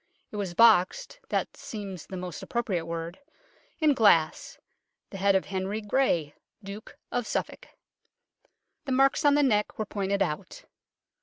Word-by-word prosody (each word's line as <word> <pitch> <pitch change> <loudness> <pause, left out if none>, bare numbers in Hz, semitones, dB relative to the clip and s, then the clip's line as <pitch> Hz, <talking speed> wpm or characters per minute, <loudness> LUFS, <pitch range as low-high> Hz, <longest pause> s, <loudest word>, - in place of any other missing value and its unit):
It - - -8
was 190 -4 -3
boxed 225 - +4
(that - - -1
seems 195 -5 -7
the 190 - -6
most 180 -2 -6
appropriate 195 -9 -2
word) 165 +1 -5 0.6
in 310 -3 +4
glass 170 - +3 0.5
the 195 - -6
head 195 +1 +3
of 190 - +1
Henry 190 +2 -3
Grey, 205 - 0 0.3
Duke 200 +2 -9
of 245 -2 -2
Suffolk. - - -4 1.2
The 270 - -1
marks 270 +4 +3
on 285 0 +6
the 290 - +4
neck 210 -6 +1
were 215 - -2
pointed 200 -1 0
out. 150 - -5
200 Hz, 145 wpm, -27 LUFS, 180-235 Hz, 1.2 s, on